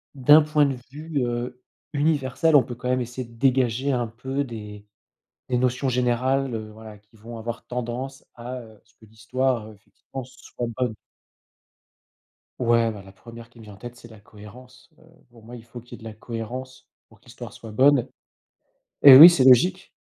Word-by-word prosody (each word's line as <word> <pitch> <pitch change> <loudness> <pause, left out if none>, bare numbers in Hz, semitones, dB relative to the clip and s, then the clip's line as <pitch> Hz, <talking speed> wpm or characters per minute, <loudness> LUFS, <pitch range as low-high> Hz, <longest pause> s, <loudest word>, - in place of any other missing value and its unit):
d'un 145 +4 +6
point 150 -1 +2
de 135 -2 -4
vue, 155 +1 -5
heu, 120 +1 -5 0.3
universel, 150 +1 0
on 140 - +7
peut 120 - -8
quand 125 +1 -6
même 125 0 0
essayer 125 +1 -7
dégager 130 +2 0
un 120 -2 -1
peu 130 +5 -4
des 105 -4 -10 0.7
des 125 - +1
notions 130 +2 -1
générales, 125 +1 -1
heu, 110 -1 -6
voilà 110 -1 -12
qui 105 +2 -27
vont 115 +2 -11
avoir 115 +1 -7
tendance 125 +2 -6
à, 125 +2 -8
heu, 110 -2 -17
ce - - -31
que - - -20
l'histoire, 115 +2 -3
heu, 110 - -13
effectivement, 120 +6 -11
soit 125 -1 -8
bonne. 125 -4 -2 1.7
Ouais, 115 -2 +2
bah, 105 -3 -9
la 95 - -15
1re 115 +3 -14
qui 120 - -18
me - - -13
vient 105 -1 -13
en - - -15
tête, 120 +4 -10
c'est 120 - -15
la 110 -2 -15
cohérence, 115 +5 -16
heu, - - -24 0.3
pour 115 -2 -19
moi, 120 - -12
il 115 -2 -12
faut 120 +1 -11
qu'il 120 - -23
y - - -6
ait - - -14
de - - -7
la 110 - -10
cohérence 120 +4 -8 0.2
pour - - -23
que - - -32
l'histoire - - -11
soit 115 - -12
bonne 135 +2 +3 1.0
et 135 -2 +11
oui, 155 +6 +12
c'est 155 -7 +2
logique. 175 +10 +4
120 Hz, 195 wpm, -23 LUFS, 115-130 Hz, 1.7 s, oui